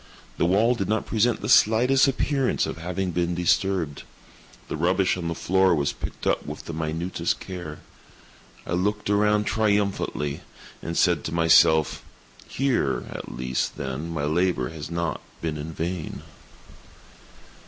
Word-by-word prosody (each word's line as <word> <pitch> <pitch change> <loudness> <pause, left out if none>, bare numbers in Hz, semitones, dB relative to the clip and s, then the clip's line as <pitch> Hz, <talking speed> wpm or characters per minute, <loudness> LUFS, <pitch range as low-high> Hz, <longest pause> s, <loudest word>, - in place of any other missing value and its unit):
The 85 - +3
wall 110 +7 +3
did 105 -5 -3
not 110 +1 0
present 115 +2 +1
the - - -4
slightest 125 +6 +5
appearance 135 0 +1
of - - -5
having 90 +2 -2
been 85 0 -1
disturbed. 90 -3 0 0.7
The - - -4
rubbish 90 +4 +2
on 90 -2 -4
the 85 - -2
floor 95 +1 +3
was 70 -2 0
picked - - -7
up - - +1
with - - -8
the 85 - -6
minutest 80 +2 -2
care. 85 -5 -7 0.8
I - - -7
looked 105 +3 0
around 105 +1 +3
triumphantly, 100 -9 0 0.4
and 85 - -4
said - - +3
to - - -3
myself: 80 -2 +4 0.4
"Here 120 - 0
at - - -7
least, 65 0 -2
then, 70 +4 -4
my 80 -3 -3
labor 80 -4 +1
has 80 -2 -7
not 85 -1 -2 0.2
been 80 -2 -3
in 75 +2 -6
vain." 85 0 -4
85 Hz, 145 wpm, -25 LUFS, 80-105 Hz, 0.8 s, slightest